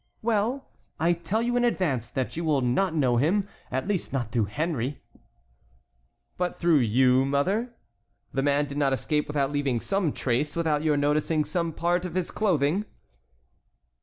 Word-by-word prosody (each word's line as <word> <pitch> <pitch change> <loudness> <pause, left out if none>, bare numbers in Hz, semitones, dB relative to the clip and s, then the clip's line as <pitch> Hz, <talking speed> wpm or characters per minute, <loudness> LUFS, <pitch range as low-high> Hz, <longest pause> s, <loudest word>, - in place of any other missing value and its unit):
"Well, 230 +4 0 0.3
I 170 +2 +3
tell 180 +7 -2
you 245 +1 0
in 245 - +2
advance 145 - 0
that 130 -1 -3
you 170 - -3
will 150 -4 +2
not 160 +9 +1
know 130 -6 +2
him, 185 - +2 0.2
at 130 +7 -2
least 200 -4 -1
not 120 -5 -2
through 115 -2 +1
Henry." 140 - -2 1.4
"But 180 0 -1
through 170 -3 +3
you, 125 +2 +4
mother? 195 - 0 0.6
The 135 - +1
man 145 +1 +2
did 145 0 -5
not 135 -2 +2
escape 150 +4 -1
without 140 -2 0
leaving 140 -4 0
some 195 - 0
trace, 135 +4 -1
without 160 -3 +1
your 155 -2 +2
noticing 150 +2 +1
some 170 +2 -1
part 175 +2 0
of 180 -2 -5
his 185 -2 -1
clothing." 185 -1 +1
150 Hz, 165 wpm, -26 LUFS, 135-180 Hz, 1.4 s, you